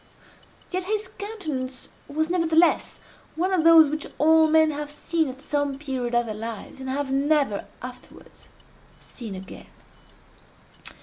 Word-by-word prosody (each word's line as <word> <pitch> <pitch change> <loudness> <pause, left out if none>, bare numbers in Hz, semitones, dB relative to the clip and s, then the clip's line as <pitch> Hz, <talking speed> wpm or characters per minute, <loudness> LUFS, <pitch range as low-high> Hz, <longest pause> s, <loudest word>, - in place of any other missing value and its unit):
Yet 365 0 -2
his 425 +2 -1
countenance 310 - -5 0.2
was, 315 +2 -1
nevertheless, 335 -1 +2 0.4
one 370 +4 0
of 350 -4 +2
those 325 -1 +8
which 305 +1 -3
all 320 +1 +5
men 315 0 +4
have 295 0 -5
seen 315 +1 -1
at 265 +2 -10
some 285 -2 -1
period 260 -4 -3
of 240 0 +3
their 220 - -4
lives, 225 +3 -7
and 265 0 -6
have 275 0 -2
never 275 -5 +1 0.2
afterwards 250 0 -11 0.5
seen 225 -6 -8
again. 190 0 -10
295 Hz, 135 wpm, -25 LUFS, 260-320 Hz, 0.5 s, those